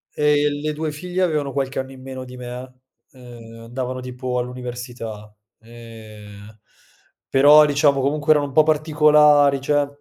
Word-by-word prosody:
Ehm, 145 Hz, -1 st, +1 dB
le 155 Hz, 0 st, -3 dB
2 155 Hz, 0 st, -4 dB
figlie 180 Hz, +4 st, -3 dB
avevano 150 Hz, -5 st, -1 dB
qualche 135 Hz, -1 st, -3 dB
anno 130 Hz, 0 st, -6 dB
in 130 Hz, -1 st, -13 dB
meno 130 Hz, -1 st, -8 dB
di 125 Hz, 0 st, -12 dB
me, 125 Hz, +1 st, -9 dB, 0.4 s
uhm, 120 Hz, -3 st, -13 dB
andavano 130 Hz, +2 st, -5 dB
tipo 125 Hz, 0 st, -5 dB
all'università, 120 Hz, -4 st, -7 dB, 0.3 s
ehm, 110 Hz, -2 st, -14 dB, 0.7 s
però 145 Hz, +3 st, +6 dB
diciamo 145 Hz, -1 st, +2 dB
comunque 150 Hz, +3 st, 0 dB
erano 145 Hz, -1 st, +3 dB
un -, -, -10 dB
po' 155 Hz, -, +6 dB
particolari, 150 Hz, -2 st, +3 dB
cioè 145 Hz, +1 st, 0 dB
135 Hz, 145 wpm, -20 LUFS, 120-150 Hz, 0.7 s, però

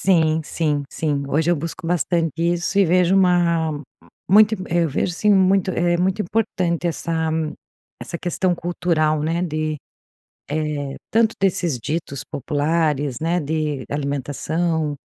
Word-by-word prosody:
Sim, 160 Hz, -4 st, +3 dB
sim, 150 Hz, -2 st, -1 dB
sim. 145 Hz, -3 st, -2 dB
Hoje 160 Hz, +4 st, +1 dB
eu 175 Hz, -, +3 dB
busco 165 Hz, +4 st, -6 dB
bastante 170 Hz, -1 st, +1 dB
isso 175 Hz, +3 st, 0 dB
e 200 Hz, -, +6 dB
vejo 180 Hz, +2 st, +3 dB
uma 170 Hz, -5 st, +2 dB, 0.5 s
muito 215 Hz, +2 st, +6 dB
Eu 170 Hz, -1 st, +2 dB
vejo, 155 Hz, +5 st, -1 dB
assim, 210 Hz, +4 st, -1 dB
muito 190 Hz, -1 st, +3 dB
é 175 Hz, 0 st, +1 dB
muito 190 Hz, +4 st, 0 dB
importante 180 Hz, -4 st, -1 dB
essa 170 Hz, 0 st, -3 dB, 0.9 s
essa 170 Hz, -, -5 dB
questão 180 Hz, +1 st, 0 dB
cultural, 165 Hz, -3 st, 0 dB
né. 165 Hz, +3 st, 0 dB
De, 155 Hz, -2 st, -2 dB, 0.7 s
eh, 150 Hz, -2 st, -2 dB, 0.2 s
tanto 225 Hz, 0 st, +3 dB
desses 175 Hz, -7 st, +1 dB
ditos 145 Hz, 0 st, -4 dB
populares, 145 Hz, -1 st, -1 dB
né. 170 Hz, +3 st, 0 dB
De 150 Hz, -1 st, -2 dB
alimentação, 150 Hz, +3 st, -1 dB
eh, -, -, -7 dB
165 Hz, 135 wpm, -21 LUFS, 150-180 Hz, 0.9 s, e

